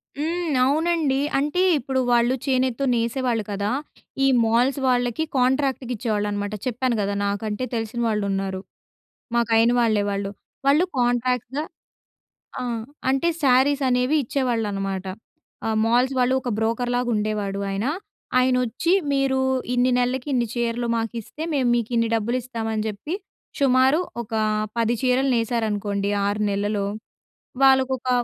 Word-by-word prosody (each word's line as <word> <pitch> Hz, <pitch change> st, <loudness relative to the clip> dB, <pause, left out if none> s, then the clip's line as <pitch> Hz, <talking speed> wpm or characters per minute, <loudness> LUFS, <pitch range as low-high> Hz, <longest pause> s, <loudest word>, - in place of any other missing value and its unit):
హ్మ్. 325 Hz, +1 st, -1 dB
అవునండి. 310 Hz, -1 st, +1 dB, 0.2 s
అంటే 295 Hz, +6 st, 0 dB, 0.2 s
ఇప్పుడు 265 Hz, +1 st, -2 dB
వాళ్ళు 240 Hz, +1 st, +3 dB
చేనెత్తో 260 Hz, -1 st, +1 dB
నేసేవాళ్ళు 235 Hz, 0 st, 0 dB
కదా! 200 Hz, +1 st, -1 dB, 0.5 s
ఈ -, -, +5 dB, 0.2 s
మాల్స్ 245 Hz, +5 st, +2 dB
వాళ్ళకి 245 Hz, +2 st, +1 dB
కాంట్రాక్ట్‌కి 260 Hz, 0 st, +1 dB
ఇచ్చేవాళ్ళనమాట. 205 Hz, -2 st, -2 dB
చెప్పాను 250 Hz, 0 st, 0 dB
కదా! 200 Hz, 0 st, -1 dB
నాకంటే, 210 Hz, +3 st, -2 dB
తెలిసిన 225 Hz, +1 st, -3 dB
వాళ్ళు 210 Hz, -2 st, 0 dB
ఉన్నారు. 195 Hz, -1 st, -2 dB, 0.7 s
మాకు 235 Hz, -1 st, +1 dB
అయిన 230 Hz, +1 st, +4 dB
వాళ్ళే 220 Hz, -3 st, +2 dB
వాళ్ళు. 200 Hz, 0 st, -3 dB, 0.4 s
వాళ్ళు 300 Hz, +6 st, +5 dB
కాంట్రాక్ట్‌గా 250 Hz, +3 st, 0 dB, 1.0 s
ఆ! -, -, -3 dB, 0.5 s
అంటే 270 Hz, +6 st, +1 dB
శారీస్ 270 Hz, +2 st, +4 dB
అనేవి 250 Hz, +4 st, +2 dB
ఇచ్చేవాళ్ళనమాట. 205 Hz, -7 st, -2 dB, 0.6 s
ఆ -, -, 0 dB, 0.2 s
మాల్స్ 245 Hz, +4 st, +2 dB
వాళ్ళు 250 Hz, +1 st, +3 dB
ఒక 250 Hz, -, -3 dB
బ్రోకర్‌లాగా 245 Hz, +2 st, 0 dB
ఉండేవాడు 210 Hz, -2 st, -2 dB
ఆయన. 195 Hz, +3 st, -2 dB, 0.5 s
ఆయనొచ్చి, 250 Hz, +6 st, +1 dB, 0.2 s
మీరు 270 Hz, -1 st, +1 dB, 0.3 s
ఇన్ని 250 Hz, +1 st, +3 dB
నెలలకి 250 Hz, +2 st, -1 dB
ఇన్ని 240 Hz, -2 st, +1 dB
చీరలు 240 Hz, 0 st, -1 dB
మాకు 225 Hz, 0 st, -2 dB
ఇస్తే 300 Hz, +8 st, -8 dB
మేము 260 Hz, -4 st, +2 dB
మీకు 235 Hz, -2 st, -1 dB
ఇన్ని 230 Hz, 0 st, +2 dB
డబ్బులు 230 Hz, +3 st, 0 dB
ఇస్తామని 225 Hz, -3 st, -3 dB
జెప్పి, 215 Hz, -, -4 dB, 0.4 s
షుమారు 265 Hz, +2 st, +4 dB, 0.2 s
ఒక 230 Hz, 0 st, -9 dB, 0.4 s
10 230 Hz, 0 st, +2 dB
చీరలు 260 Hz, +1 st, +2 dB
నేసారనుకోండి. 210 Hz, -3 st, -1 dB, 0.2 s
6 205 Hz, +1 st, -1 dB
నెలలు, 200 Hz, 0 st, -1 dB, 0.8 s
వాళ్ళకొక 265 Hz, -1 st, +3 dB
245 Hz, 125 wpm, -23 LUFS, 215-260 Hz, 1.0 s, ఈ